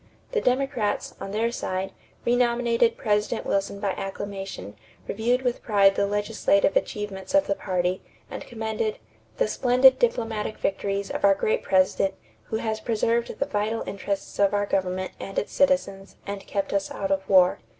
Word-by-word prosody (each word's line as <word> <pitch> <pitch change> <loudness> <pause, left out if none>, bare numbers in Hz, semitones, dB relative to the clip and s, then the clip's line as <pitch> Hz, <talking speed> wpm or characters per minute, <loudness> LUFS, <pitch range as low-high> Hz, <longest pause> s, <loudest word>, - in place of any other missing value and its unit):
The 460 -2 +1
Democrats, 250 - 0
on - - -5
their 225 +3 0
side, 190 -4 -3 0.3
renominated 235 -1 +2
President 210 +1 0
Wilson 200 0 -1
by 200 -1 0
acclamation, 195 - -6 0.3
reviewed 240 +5 0
with 245 -1 -1
pride 200 -3 +4
the 200 +1 +1
legislative 205 -1 +1
achievements 205 +2 -2
of 290 - +5
the - - +1
party, 185 -1 -1 0.3
and - - -7
commended 220 -1 -2 0.4
"the - - +2
splendid 255 +3 +5
diplomatic 225 - -1
victories 195 0 -2
of - - -4
our 200 -1 +6
great 215 - 0
President 190 0 +2 0.3
who - - -4
has 220 0 -2
preserved 230 +1 0
the 275 - 0
vital 220 -2 -1
interests 200 0 -4
of 200 0 +4
our 205 0 +1
government 185 -1 -1
and 195 - -7
its - - -2
citizens 200 -9 +1
and 200 -1 -6
kept 200 0 -2
us 200 -1 0
out 195 -1 -3
of 190 0 -1
war." 185 -2 +5
205 Hz, 160 wpm, -25 LUFS, 195-230 Hz, 0.4 s, our